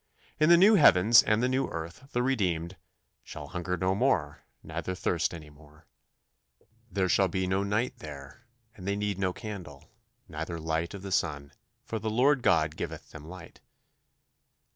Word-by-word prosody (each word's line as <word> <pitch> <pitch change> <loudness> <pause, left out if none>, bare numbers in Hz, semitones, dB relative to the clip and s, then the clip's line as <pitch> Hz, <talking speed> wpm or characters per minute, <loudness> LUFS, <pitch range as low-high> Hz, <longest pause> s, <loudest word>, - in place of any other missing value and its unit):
In 155 +1 +4
the 170 - +8
new 200 +5 +7
heavens 115 - +7
and 110 +2 +1
the - - +3
new 130 +1 0
earth 85 +11 -7
the 120 - 0
redeemed 90 -9 -1 0.5
"shall - - -9
hunger 90 +1 -3
no 95 +2 +1
more, 95 - 0 0.2
neither 95 - -4
thirst 90 -1 0
any 75 -3 -10
more"; 75 +2 -19 1.1
"There 95 -2 0
shall 95 +2 +3
be 95 +1 -2
no 95 +1 0
night 105 +5 -1
there; 75 - -11 0.3
and 95 -1 -10
they 100 - 0
need 100 -1 -2
no 95 -1 +1
candle, 90 -9 -9 0.4
neither 80 +2 -5
light 80 +3 -2
of 100 - -9
the 100 - -6
sun; 75 -6 -1 0.3
for 115 -4 -4
the 110 +1 -3
Lord 130 +5 +3
God 80 -7 +2
giveth - - -6
them 80 -1 -11
light." 90 0 -12
95 Hz, 165 wpm, -28 LUFS, 80-110 Hz, 1.1 s, the